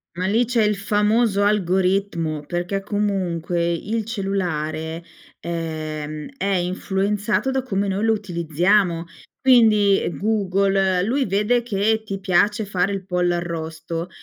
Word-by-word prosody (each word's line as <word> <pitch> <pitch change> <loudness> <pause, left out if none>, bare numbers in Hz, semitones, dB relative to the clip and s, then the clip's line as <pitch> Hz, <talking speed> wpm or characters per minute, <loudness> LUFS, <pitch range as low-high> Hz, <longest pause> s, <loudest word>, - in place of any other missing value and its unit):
Ma 180 +1 -2
lì 220 +5 +3
c'è 235 -1 +1
il 210 0 +2
famoso 210 +1 +2
algoritmo, 185 -5 +1
perché 175 +3 -2
comunque 185 -5 -1
il 215 +6 -2
cellulare, 170 -6 -3 0.4
ehm, 155 -2 -5
è 200 - -3
influenzato 195 +5 0
da 265 0 0
come 200 -5 -1
noi 195 +3 -1
lo 225 - +4
utilizziamo. 175 -2 +1 0.3
Quindi 220 -6 +5 0.2
Google, 195 -3 +1
lui 260 +7 +1
vede 210 +5 +2
che 220 0 0
ti 195 -2 -5
piace 205 +3 +2
fare 190 -1 0
il 195 -1 -4
pollo 180 -1 +1
arrosto, 165 0 -4
195 Hz, 120 wpm, -22 LUFS, 175-210 Hz, 0.4 s, Quindi